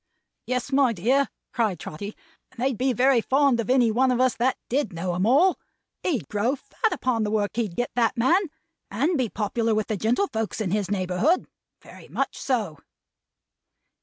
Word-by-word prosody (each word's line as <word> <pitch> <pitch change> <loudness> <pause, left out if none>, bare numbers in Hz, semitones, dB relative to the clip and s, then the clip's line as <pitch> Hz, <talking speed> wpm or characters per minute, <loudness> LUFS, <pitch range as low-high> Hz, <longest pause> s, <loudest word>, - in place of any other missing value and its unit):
"Yes, 250 +2 -2
my 270 -3 +3
dear," 255 +9 +1 0.2
cried 215 -8 0
Trotty; 200 +7 -7 0.3
"and 260 - -18
they'd 260 +1 +1
be 255 +3 +1
very 255 +1 +3
fond 270 0 +2
of 230 - -2
any 250 -3 +4
one 255 +4 +2
of 250 -1 +1
us 255 -1 +3
that 250 +2 +1
did 260 -3 0
know 175 +2 -3
'em 185 +4 0
all. 325 +10 +4 0.4
He'd 260 - -1
grow 220 +6 0
fat 430 - -2
upon 250 -3 0
the 210 - 0
work 210 -1 0
he'd 215 -7 -2
get, 245 - -2
that 240 +1 +1
man, 295 +11 +4 0.5
and 280 - 0
be 255 -6 0
popular 225 +2 -1
with 215 -1 0
the 215 - -2
gentlefolks 225 - -1
in 200 -5 -2
his 205 -2 0
neighborhood. 200 - +1 0.4
Very - - -14
much - - -2
so!" 215 - -2
235 Hz, 180 wpm, -25 LUFS, 210-265 Hz, 0.5 s, any